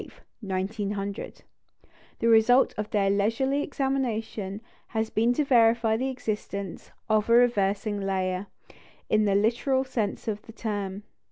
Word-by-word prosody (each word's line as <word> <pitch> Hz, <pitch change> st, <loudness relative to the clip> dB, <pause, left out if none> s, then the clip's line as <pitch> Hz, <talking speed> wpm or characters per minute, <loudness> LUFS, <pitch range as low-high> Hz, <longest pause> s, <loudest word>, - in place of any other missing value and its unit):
The 190 Hz, -2 st, -2 dB, 1.5 s
result 230 Hz, +3 st, +5 dB
of 210 Hz, 0 st, -4 dB
their 195 Hz, -2 st, +2 dB
leisurely 230 Hz, +8 st, +1 dB
examination 230 Hz, -8 st, -2 dB, 0.3 s
has 220 Hz, -1 st, -2 dB
been 230 Hz, +3 st, +2 dB
to 295 Hz, +4 st, 0 dB
verify 230 Hz, -3 st, +4 dB
the 260 Hz, +4 st, -1 dB
existence 210 Hz, -6 st, -5 dB, 0.2 s
of 215 Hz, 0 st, +1 dB
a -, -, +5 dB
"reversing 205 Hz, -3 st, +2 dB
layer," 190 Hz, 0 st, -1 dB, 0.6 s
in 215 Hz, 0 st, +4 dB
the 200 Hz, -1 st, +2 dB
literal 240 Hz, +6 st, +2 dB
sense 235 Hz, -6 st, -3 dB
of 210 Hz, -1 st, -2 dB
the 225 Hz, -, -13 dB
term. 205 Hz, -3 st, -4 dB
220 Hz, 120 wpm, -27 LUFS, 200-240 Hz, 1.5 s, result